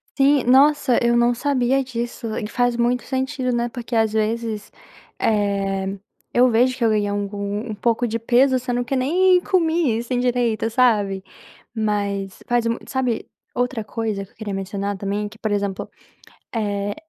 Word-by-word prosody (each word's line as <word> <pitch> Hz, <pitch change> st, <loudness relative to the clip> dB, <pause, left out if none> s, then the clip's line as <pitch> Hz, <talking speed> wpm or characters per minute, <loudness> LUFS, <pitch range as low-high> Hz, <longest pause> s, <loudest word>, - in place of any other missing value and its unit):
Sim, 280 Hz, -1 st, +4 dB
nossa, 270 Hz, 0 st, +4 dB
eu 235 Hz, 0 st, +3 dB
não 240 Hz, 0 st, +4 dB
sabia 270 Hz, 0 st, +1 dB
disso, 235 Hz, -2 st, -4 dB
e 210 Hz, -, -3 dB
faz 245 Hz, +2 st, 0 dB
muito 240 Hz, +1 st, +1 dB
sentido, 260 Hz, -1 st, -2 dB
né, 240 Hz, 0 st, 0 dB
porque 235 Hz, 0 st, -5 dB
às 220 Hz, -1 st, +2 dB
vezes, 220 Hz, -1 st, -2 dB, 0.5 s
eh, 195 Hz, -2 st, 0 dB, 0.3 s
eu 250 Hz, +1 st, +5 dB
vejo 250 Hz, +3 st, +3 dB
que 235 Hz, -, +1 dB
eu -, -, +4 dB
ganhei 210 Hz, -1 st, +1 dB
algum 205 Hz, +2 st, -3 dB
um -, -, -3 dB
pouco 235 Hz, +3 st, 0 dB
de 230 Hz, +1 st, -2 dB
peso 255 Hz, +3 st, +3 dB
sendo 245 Hz, -1 st, -2 dB
que 270 Hz, -, -1 dB
nem 360 Hz, +8 st, +3 dB
comi, 330 Hz, -, +1 dB
assim, 240 Hz, +2 st, -2 dB
direito, 240 Hz, -3 st, +1 dB
sabe, 210 Hz, -5 st, +2 dB, 0.5 s
mas 200 Hz, -3 st, -2 dB
faz 240 Hz, -1 st, +1 dB
mu 230 Hz, -, 0 dB
sabe, 255 Hz, -4 st, -1 dB, 0.3 s
outra 245 Hz, -2 st, -1 dB
coisa 215 Hz, -2 st, -3 dB
que 195 Hz, -, -16 dB
eu -, -, -32 dB
queria 210 Hz, -3 st, -5 dB
mencionar 200 Hz, +1 st, -3 dB
também, 200 Hz, +2 st, -2 dB
que, 215 Hz, +1 st, -14 dB
por 215 Hz, -, -2 dB
exemplo, 200 Hz, -1 st, -2 dB, 0.7 s
eh, 205 Hz, -2 st, -1 dB
230 Hz, 165 wpm, -22 LUFS, 205-250 Hz, 0.7 s, eu